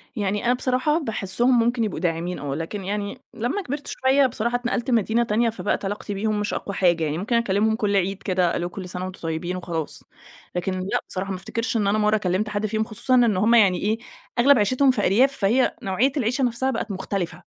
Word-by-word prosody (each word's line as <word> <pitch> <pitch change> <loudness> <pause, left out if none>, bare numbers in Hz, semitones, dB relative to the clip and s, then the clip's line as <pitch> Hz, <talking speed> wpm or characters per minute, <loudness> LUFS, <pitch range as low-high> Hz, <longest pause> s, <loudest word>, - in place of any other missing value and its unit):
يعني 205 0 -1
أنا 245 - +4
بصراحة 255 +4 +1
باحسهم 235 - +1
ممكن 235 0 +1
يبقوا 205 -7 -2
داعمين 175 +1 -2
آه، 140 -1 -3
لكن 175 +5 -5
يعني 205 +5 -4
لمّا 250 - -2
كبرت 285 -2 -5
شوية، 270 +1 +3
بصراحة 235 0 -2
اتنقلت 240 0 -1
مدينة 230 +1 +2
تانية، 230 +1 +1
فبقت 205 -2 -2
علاقتي 205 +1 -4
بيهم 210 +1 -1
مش 205 - -2
أقوى 200 - -4
حاجة 175 -3 +2
يعني، 155 0 -1
ممكن 215 +6 -1
أكلمهم 220 -1 +2
كل 205 -2 0
عيد 195 +1 0
كده، 180 -3 +1
الو 175 +1 -2
كل 185 -1 -7
سنة 180 0 -5
وأنتم 185 - -8
طيبين 165 +2 -3
وخلاص. 170 -4 -4 0.5
لكن 180 +2 -1
لأ 185 +2 -1
بصراحة 190 +1 -1
ما 185 - -3
أفتكرش 230 +5 -2
إن 205 -2 +1
أنا 210 +2 +2
مرة 215 0 +3
كلمت 195 +2 -1
حد 205 +1 -2
فيهم، 220 +1 0
خصوصًا 245 +4 0
إن 235 -6 +4
هُم 225 +5 +4
يعني 195 -5 +5
إيه، 215 +2 +1 0.4
أغلب 275 +2 +6
عيشتهم 255 +6 +3
في 225 -5 -1
أرياف، 260 +8 +3
فهي 230 +6 +2
نوعية 215 +8 +1
العيشة 250 +2 0
نفْسَها 250 +2 +1
بقت 225 -2 -3
مختلفة، 190 -2 -4
210 Hz, 210 wpm, -23 LUFS, 190-240 Hz, 0.5 s, أغلب